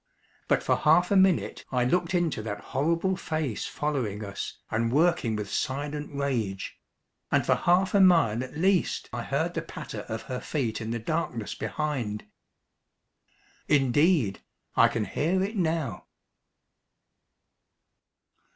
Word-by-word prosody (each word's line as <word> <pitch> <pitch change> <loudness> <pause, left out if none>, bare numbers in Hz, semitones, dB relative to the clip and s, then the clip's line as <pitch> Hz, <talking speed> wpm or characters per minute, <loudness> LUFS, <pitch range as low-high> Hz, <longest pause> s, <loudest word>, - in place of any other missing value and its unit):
But - - +2
for - - +2
half 175 +4 +4
a - - +4
minute 190 -2 +3
I 125 -2 +2
looked 180 +6 +1
into 170 -10 0
that 105 -1 -4
horrible 165 +7 +1
face 155 - -3
following 120 -9 -2
us 100 0 -6
and 115 +1 0
working 150 -6 +2
with 105 -1 -4
silent 145 +2 -2
rage; 125 -9 -2 0.5
and - - +3
for - - +4
half 180 +2 +2
a 200 - +5
mile 165 - +5
at 130 - -8
least 185 +1 +1
I - - -2
heard - - -1
the - - -2
patter - - -7
of 110 0 -4
her 125 -1 -4
feet 120 -7 -2
in 110 - -4
the 120 - -1
darkness 120 -3 -2
behind. 130 -9 -3 1.4
Indeed, 140 - +3 0.3
I - - +6
can 110 -2 -2
hear 170 - 0
it 205 +4 -3
now. 160 - -1
145 Hz, 135 wpm, -27 LUFS, 115-170 Hz, 1.4 s, I